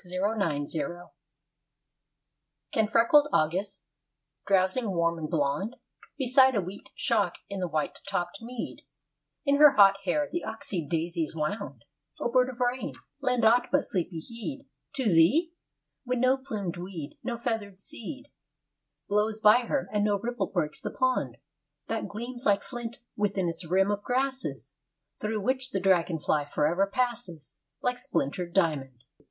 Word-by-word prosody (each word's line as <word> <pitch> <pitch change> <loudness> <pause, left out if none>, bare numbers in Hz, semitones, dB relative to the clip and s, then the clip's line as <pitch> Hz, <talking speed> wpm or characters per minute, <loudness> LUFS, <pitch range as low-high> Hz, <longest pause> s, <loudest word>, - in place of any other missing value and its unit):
THE 180 0 -6
RAIN 185 -8 0
CROW 170 +4 -4
I - - -22 1.6
Can 220 -2 +2
freckled 235 +7 +5
August, 190 +6 0 0.6
drowsing 195 +4 +2
warm 170 -2 +1
and 155 -1 -4
blond 155 - 0 0.4
Beside 260 -1 +5
a 205 - +2
wheat 185 +3 -8
shock 205 -6 +1
in 200 -1 -4
the 180 - -1
white 155 -2 -2
topped 180 0 -2
mead, 240 +1 -6 0.6
In 280 0 +4
her 295 -1 +8
hot 195 -1 +7
hair 290 +11 +1
the 345 - -2
oxeyed 190 -8 -4
daisies 165 -1 -1
wound, 150 - -3 0.3
O 240 - -1
bird 255 0 +4
of 250 -1 -9
rain, 250 +1 -1 0.3
lend 250 -3 +2
aught 240 +2 +5
but - - +3
sleepy 175 -2 -3
heed 240 - -5 0.3
To 270 - -2
thee? 210 - +4 0.5
when 250 -1 -1
no 255 +1 +4
plumed 205 -9 -4
weed, 175 -5 -7
no 235 -1 -3
feather'd 225 -5 -3
seed 270 +7 -7 0.8
Blows 210 +1 +1
by 220 +3 +6
her; 280 - 0
and 205 -1 +2
no 205 -1 +2
ripple 240 +4 -2
breaks 155 -5 -2
the - - -3
pond, 255 - 0 0.5
That 225 -1 -2
gleams 240 +4 -6
like 205 -1 +3
flint 240 -2 -6 0.2
within 200 -3 0
its 165 0 -3
rim 190 +3 +3
of 205 0 -1
grasses, 215 - -2 0.4
Through 215 0 -2
which 260 +3 0
the 195 - -1
dragon 180 -3 +2
fly 150 -1 0
forever 165 +7 +1
passes 235 - -3 0.3
Like 250 0 0
splintered 175 - -2
diamond. 140 -9 0
205 Hz, 150 wpm, -28 LUFS, 170-245 Hz, 1.6 s, her